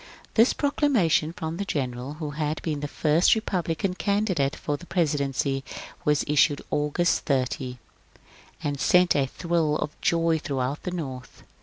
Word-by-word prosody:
'* - - -26
This 230 +3 +5
proclamation 245 - +2
from 160 -1 -5
the 200 - -2
general 130 -5 -3
who 155 -2 -5
had 150 0 -2
been 155 -3 -2
the 145 - -3
first 155 +6 +3
Republican 180 -3 -1
candidate 190 -8 0
for 145 - -2
the 175 +5 -11
presidency 140 -5 0 0.4
was 150 -3 +2
issued 145 0 +3
August 150 +4 +1
30, 130 -2 -1 0.9
and 145 -1 -2
sent 180 +3 +4
a 135 -1 +2
thrill 165 0 0
of 150 -1 -2
joy 165 -1 +2
throughout 135 0 -2
the - - -4
North. 135 -8 -6
155 Hz, 150 wpm, -26 LUFS, 140-175 Hz, 0.9 s, This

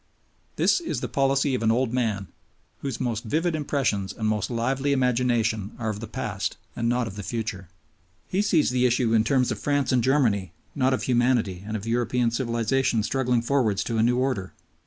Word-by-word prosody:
This - - +3
is 340 - -3
the - - -2
policy 135 0 +1
of 125 - -1
an 110 - +2
old 125 +1 +1
man, 110 -6 -1 0.5
whose 135 -2 -4
most 115 -4 -2
vivid 160 +9 0
impressions 135 -10 -1
and 110 -2 -3
most 110 -1 0
lively 130 +4 0
imagination 120 -5 +1
are 110 -2 -2
of 105 - -6
the 110 - -6
past 125 -3 -3 0.2
and 115 - 0
not 120 0 +1
of 100 -2 -7
the - - -4
future. 105 -3 -4 0.6
He 190 - 0
sees 170 -10 +2
the 125 0 +3
issue 120 -1 +1
in 110 -1 +4
terms, 125 0 +2
of 110 - -3
France 145 -1 0
and 125 -2 +2
Germany 110 - +2 0.2
not 130 0 +2
of - - -5
humanity 120 -7 +1
and 110 0 -2
of 105 - -8
European 120 +1 +1
civilization 120 0 0
struggling 125 0 0
forwards 120 -6 +1
to 115 -2 -2
a - - +4
new 120 +2 +3
order. 125 -8 -1
120 Hz, 195 wpm, -25 LUFS, 110-130 Hz, 0.6 s, in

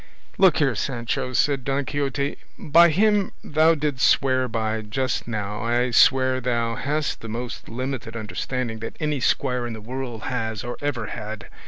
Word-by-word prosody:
"Look 190 -4 +6
here, 140 -4 +2
Sancho," 120 +2 -2
said 135 0 +2
Don 135 +1 -1
Quixote, 140 0 -1 0.2
"by 170 +3 +5
him 205 +3 +2
thou 155 +2 +4
didst 145 -3 +1
swear 130 -1 +2
by 110 -1 -1
just 125 +5 -2
now 105 -1 -3
I 120 +2 +1
swear 130 0 +4
thou 120 -2 0
hast 145 +5 -2
the 115 - -7
most 120 +2 -5
limited 125 -1 -4
understanding 115 +1 -3
that 115 - -7
any 150 -2 -1
squire 125 -1 0
in 120 - -5
the 110 - -7
world 120 0 -6
has 110 -4 -3
or 120 0 -4
ever 135 -6 -2
had. 105 0 -7
125 Hz, 165 wpm, -24 LUFS, 115-140 Hz, 0.2 s, Look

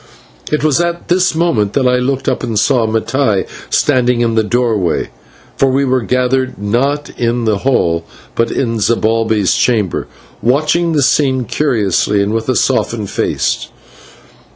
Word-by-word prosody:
It 150 - 0
was 155 +1 +2
at 170 0 -3
this 180 -1 +2
moment 125 -12 +1
that 130 -2 +2
I 125 0 +3
looked 130 +1 -2
up 130 - 0
and 115 -4 -2
saw 115 +2 +2
Mattai 110 -1 0 0.2
standing 125 -3 +2
in 115 -1 +1
the 110 0 +2
doorway, 110 -5 0 0.5
for 135 - +3
we 135 +2 +1
were 130 -1 +1
gathered, 125 +2 0
not 135 +8 -1
in 120 0 0
the 105 -3 +1
hall, 85 -11 +1 0.3
but 115 0 0
in 115 -3 -1
Zibalbay's 110 -1 +1
chamber 110 -7 0 0.3
watching 155 +7 +1
the 145 -3 +2
scene 130 -2 +2
curiously 105 - +1
and 100 +2 -2
with 115 +2 -2
a 130 - +2
softened 115 -6 0
face. - - -1
125 Hz, 155 wpm, -15 LUFS, 110-135 Hz, 0.5 s, I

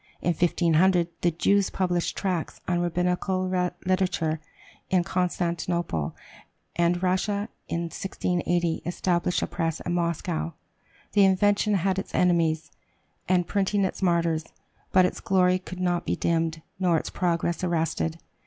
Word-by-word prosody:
In - - -1
1500 175 +1 +3
the 175 - +3
Jews 195 +4 +2
published 180 -2 -1
tracts 180 -5 -2
on 175 -1 +1
Rabbinical 180 +2 0 0.4
literature 180 -4 +1 0.5
in 185 -2 +3
Constantinople. 170 - -1 0.6
And 175 +1 +1
Russia, 200 +3 0 0.2
in 170 - -2
1680, 175 -1 -1
established 175 +1 0
a - - +2
press 165 -2 -2
in 175 - -3
Moscow. 165 - -1 0.6
The 205 - +5
invention 205 +2 +3
had 190 +1 +1
its - - -6
enemies, 165 -4 +2 0.6
and 180 -1 +3
printing 200 +1 +1
its 190 - -4
martyrs; 170 -3 +1 0.5
but 185 -1 +6
its 180 - -2
glory 185 -1 +3
could 185 0 -9
not 175 -1 0
be - - +1
dimmed, 165 -1 0 0.2
nor 180 -3 +3
its - - -4
progress 170 -1 0
arrested. 165 -1 0
175 Hz, 130 wpm, -26 LUFS, 170-185 Hz, 0.6 s, but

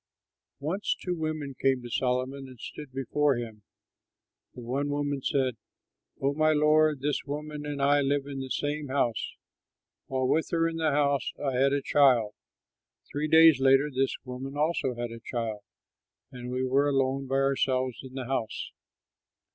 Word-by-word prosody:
Once 170 +9 -1
two 180 - -2
women 155 -3 -3
came 135 -2 +2
to - - -6
Solomon 130 +2 -1
and 130 -2 -13
stood 150 +2 -8
before 135 +2 +1
him. 115 -3 -6 0.9
The 125 - -8
one 135 +5 -2
woman 145 -1 -1
said, 130 -3 0 0.6
"Oh, 140 +1 +1
my 155 +1 +3
lord, 150 -1 +3
this 145 +1 -1
woman 150 +1 -5
and 145 -1 -4
I 145 +1 +4
live 140 0 0
in 140 -1 -6
the 135 0 -5
same 145 +2 -2
house. 130 -4 -1 0.7
While 130 -1 0
with 160 +4 +2
her 165 -1 +2
in 165 0 -4
the 160 -1 +1
house 140 -2 +1
I 135 -2 -2
had 135 +2 +3
a 140 -1 0
child. 125 -8 +4 0.8
Three 150 +2 -1
days 160 -2 +7
later 135 +2 +4
this 135 +1 +1
woman 135 +2 -6
also 150 -4 0
had 120 0 -4
a 115 - -8
child, 115 -2 -4 0.7
and 125 -1 -7
we 130 +1 -1
were 140 +3 +2
alone 135 0 0
by 135 - -1
ourselves 130 -2 +1
in 130 -1 -11
the 130 -2 -4
house. 120 -4 -3
135 Hz, 165 wpm, -28 LUFS, 130-145 Hz, 0.9 s, days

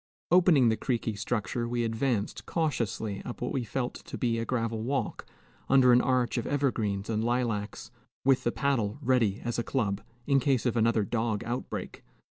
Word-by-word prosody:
Opening 170 -9 +6
the 110 - +1
creaky 115 -3 -1
structure, 110 +2 -2
we 120 0 0
advanced 115 -1 -1
cautiously 115 - -1
up 120 - -7
what 125 - -2
we 130 - -1
felt 120 +3 -2
to - - -6
be 115 -2 0
a 115 - -2
gravel 115 -3 -1
walk, 135 +4 -2 0.4
under 130 -2 +6
an 125 - +6
arch 125 -2 +1
of 115 - -4
evergreens 110 -8 0
and 110 -1 -1
lilacs, 115 -4 -2 0.3
with 135 -1 +4
the 120 - +1
paddle 120 -6 0
ready 125 -7 +1
as 120 0 -2
a - - 0
club, 105 -7 -1 0.2
in 140 -1 +3
case 130 -2 +1
of 120 - +1
another 115 -1 +3
dog 110 0 -1
outbreak. 120 +2 -5
120 Hz, 175 wpm, -29 LUFS, 110-130 Hz, 0.4 s, Opening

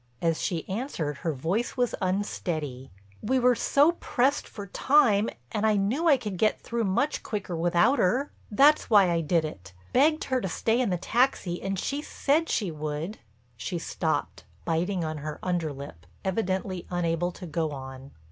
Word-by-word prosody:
As 165 -1 0
she 170 -3 -2
answered 190 - -3
her 165 - -2
voice 175 - -2
was 245 -2 +1
unsteady: 165 -8 -2 0.3
"We 260 +5 +1
were 250 0 +5
so 285 +6 +4
pressed 275 +3 +1
for 205 - -8
time 225 -1 +3 0.2
and 210 - -2
I 215 -1 +4
knew 225 +12 +1
I 290 -4 +6
could 210 -7 -5
get 215 - +2
through 230 -1 -2
much 200 +10 0
quicker 200 -5 -4
without 175 +10 +3
her. 250 +10 +1 0.2
That's 285 +8 +4
why 200 -5 +6
I 170 -1 +1
did 165 0 +1
it—begged 125 - 0
her 260 -1 0
to 190 - -2
stay 225 +8 +1
in 240 - +1
the 180 - 0
taxi 200 -3 0
and 195 0 -2
she 280 +9 -2
said 305 +2 0
she 200 -6 0
would,"—she 150 - -6
stopped, 95 - -2 0.2
biting 175 +3 0
on 155 -1 -3
her 150 +1 -5
under 175 -4 -1
lip, 90 -12 -10 0.2
evidently 190 -2 -2
unable 175 0 0
to 185 - -9
go 160 -1 -1
on. 135 -1 -8
185 Hz, 165 wpm, -27 LUFS, 155-230 Hz, 0.3 s, I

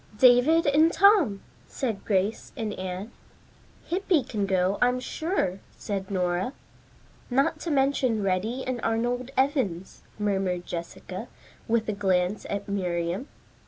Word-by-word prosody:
"David 255 +7 +6
and 310 +3 +5
Tom," 380 - +4 0.2
said 230 -7 -3
Grace 200 +2 0
and 220 -3 -2
Anne. 185 +3 -5 0.7
"Hippy 360 -4 +1
can 210 -5 -2
go, 190 +1 +1
I'm 250 0 +3
sure," 255 - -2 0.2
said 195 -2 -4
Nora. 180 +4 -1 0.8
"Not 275 +5 +1
to 335 - -4
mention 270 -6 +2
Reddy 205 +7 -1
and 255 -2 -3
Arnold 240 +3 -1
Evans," 260 - 0 0.2
murmured 190 -4 -1
Jessica, 170 -1 -6 0.4
with 225 -1 +1
a 215 - 0
glance 190 0 0
at 200 0 -3
Miriam. 180 - -2
215 Hz, 125 wpm, -26 LUFS, 190-265 Hz, 0.8 s, David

